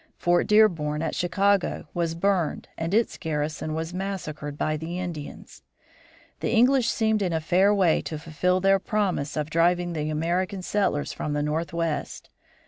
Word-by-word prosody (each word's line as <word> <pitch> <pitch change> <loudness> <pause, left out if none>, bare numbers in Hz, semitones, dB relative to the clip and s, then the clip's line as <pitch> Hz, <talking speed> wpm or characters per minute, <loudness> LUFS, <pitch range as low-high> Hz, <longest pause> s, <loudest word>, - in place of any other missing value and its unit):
Fort 175 -1 +2
Dearborn, 165 -8 +3
at 160 - -2
Chicago, 195 +2 +1
was 170 -2 -1
burned 180 -2 0
and 165 +1 -3
its 225 +3 +1
garrison 155 -1 -3
was 160 +2 -4
massacred 165 -6 -5
by 155 0 0
the 160 +3 -5
Indians. 170 -5 -7 0.8
The - - -2
English 245 +1 +4
seemed 220 -1 +1
in 180 -3 0
a 160 - +1
fair 185 +5 +3
way 190 -6 +3
to 155 - -5
fulfill 170 +4 0
their 195 0 +4
promise 190 -9 -1
of 150 0 -2
driving 175 +1 +2
the 155 -1 -2
American 175 +5 -1
settlers 190 -8 0
from 150 - -3
the 145 0 0
Northwest. 165 +1 -3
170 Hz, 155 wpm, -25 LUFS, 155-195 Hz, 0.8 s, English